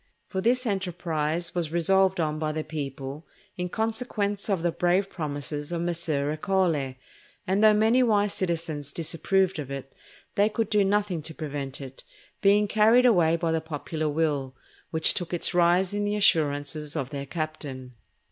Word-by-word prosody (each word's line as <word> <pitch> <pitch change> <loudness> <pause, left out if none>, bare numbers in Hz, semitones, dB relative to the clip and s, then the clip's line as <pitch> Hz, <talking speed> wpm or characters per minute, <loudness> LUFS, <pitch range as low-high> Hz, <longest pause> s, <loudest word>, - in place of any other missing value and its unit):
For 190 - -2
this 250 +4 +2
enterprise 175 -5 -1
was 170 -3 -2
resolved 190 +2 +3
on 155 -2 0
by 155 -1 -1
the 155 0 -2
people 140 -1 -6 0.3
in 180 0 -3
consequence 220 -2 -2
of 190 -5 0
the 175 - +2
brave 180 +4 +1
promises 145 -1 -4
of 170 -1 -2
Messer 160 -4 -1
Ercole; 155 -5 0 0.5
and 195 +2 +1
though 215 -1 +7
many 220 +4 +4
wise 210 -4 +2
citizens 165 -5 -2
disapproved 175 +3 0
of 140 -3 -5
it, 135 -1 -7 0.4
they 205 +1 +3
could 220 -1 -2
do 210 -1 +4
nothing 200 -3 0
to 160 +1 -6
prevent 140 -3 -5
it, 135 -1 -10 0.4
being 205 +1 +4
carried 220 +4 +5
away 175 -9 +4
by 165 -1 -1
the 160 0 0
popular 155 0 -3
will, 145 -4 -1 0.3
which 160 -1 +3
took 175 0 -3
its 175 - +1
rise 175 +2 +3
in 205 0 -1
the 205 0 0
assurances 150 -5 +2
of 140 -4 -3
their 140 -1 -5
captain. 145 -5 -5
170 Hz, 165 wpm, -26 LUFS, 150-195 Hz, 0.5 s, though